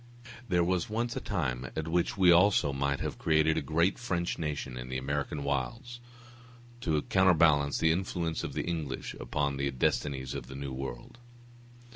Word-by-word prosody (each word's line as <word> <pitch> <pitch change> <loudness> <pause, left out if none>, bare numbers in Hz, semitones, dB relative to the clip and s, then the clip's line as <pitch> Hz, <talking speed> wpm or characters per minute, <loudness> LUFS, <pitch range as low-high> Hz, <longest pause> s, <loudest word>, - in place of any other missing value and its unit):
There 90 -2 +3
was 90 +1 0
once 115 +2 -2
a - - -1
time 65 - -2
at 80 0 -3
which 85 +4 0
we 90 -2 +6
also 85 -5 +4
might 70 +1 -1
have - - -4
created 80 0 +3
a 80 - 0
great 80 +6 +1
French 90 -7 -2
nation 75 -5 -3
in 60 0 -7
the 65 - -2
American 70 +2 -2
wilds, 115 - -3 0.8
to 80 -8 0
counterbalance 80 -6 +4
the 80 - +3
influence 85 -2 -2
of - - -4
the - - -2
English 80 -6 -3
upon 70 +3 -1
the 70 0 0
destinies 65 0 -1
of 65 -3 -6
the 65 - -9
New 70 -1 -5
World. 65 - -7
75 Hz, 170 wpm, -30 LUFS, 70-85 Hz, 0.8 s, we